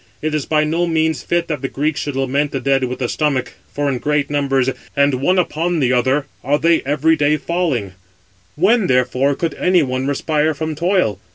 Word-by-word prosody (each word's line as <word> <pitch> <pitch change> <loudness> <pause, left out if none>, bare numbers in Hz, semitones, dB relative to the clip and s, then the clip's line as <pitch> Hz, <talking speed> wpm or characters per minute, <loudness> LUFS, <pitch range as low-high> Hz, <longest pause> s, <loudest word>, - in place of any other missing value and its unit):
It 155 0 -2
is 150 -3 -2
by 155 -1 +2
no 165 +3 0
means 160 -2 0
fit 170 0 -1
that 150 -5 -3
the 135 - -2
Greeks 150 +3 -2
should 145 -2 -4
lament 135 +2 0
the 135 - -3
dead 135 0 +1
with 125 0 -4
the 125 - -2
stomach, 140 -2 -1 0.2
for 145 0 -2
in 130 -3 -1
great 145 0 -1
numbers 135 -3 +1 0.3
and 140 0 +3
one 180 +6 +2
upon 175 -1 0
another 130 +3 +1 0.2
are 145 +3 +2
they 165 +1 +2
every 150 +3 +2
day 150 0 +2
falling; 150 - -2 0.6
when 200 +6 +3
therefore 125 +2 +1
could 165 +2 -2
any 180 -2 +2
one 130 0 -2
respire 150 +2 0
from 155 +2 -3
toil? 170 - 0
145 Hz, 195 wpm, -18 LUFS, 135-160 Hz, 0.6 s, and